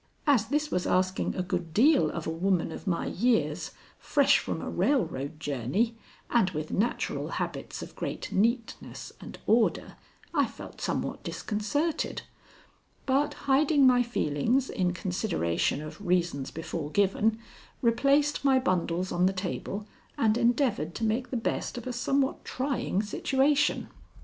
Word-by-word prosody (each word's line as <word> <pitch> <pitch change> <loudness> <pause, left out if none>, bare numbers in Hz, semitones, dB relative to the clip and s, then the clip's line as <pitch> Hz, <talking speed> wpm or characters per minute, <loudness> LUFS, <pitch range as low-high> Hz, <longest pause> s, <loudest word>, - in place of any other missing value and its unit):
As 260 -8 +4
this 300 +4 0
was 180 - 0
asking 185 +1 +1
a 185 - -1
good 175 -3 -3
deal 280 +6 +5
of 170 - -5
a - - -1
woman 175 0 0
of 200 - -8
my 170 -3 0
years, 235 +3 +1 0.3
fresh - - +4
from - - -3
a - - -5
railroad 155 - 0
journey 155 - -1 0.4
and 230 -6 +4
with 155 -3 -5
natural 225 +5 -1
habits - - -4
of - - -11
great - - -4
neatness 230 +3 -1
and - - -9
order, 225 0 +2 0.4
I - - +3
felt - - -11
somewhat - - -2
disconcerted, 285 +10 -2 0.8
but 275 +2 +1
hiding 280 +1 +4
my 250 -1 +6
feelings 240 - 0
in 180 -1 +1
consideration 180 - -1
of 155 +7 -9
reasons 175 -7 0
before 160 -1 -5
given, 205 +4 +2 0.5
replaced 280 +6 +3
my 270 -2 +5
bundles 180 -5 0
on 180 +1 +3
the 190 - +1
table 190 +2 -4 0.3
and 220 -1 +3
endeavored 235 - +1
to - - -4
make 225 +3 0
the 255 - -2
best 230 - -2
of 240 - -6
a 255 - -3
somewhat 270 +3 0
trying 255 -6 -1
situation. 275 +7 +1
215 Hz, 145 wpm, -28 LUFS, 180-260 Hz, 0.8 s, my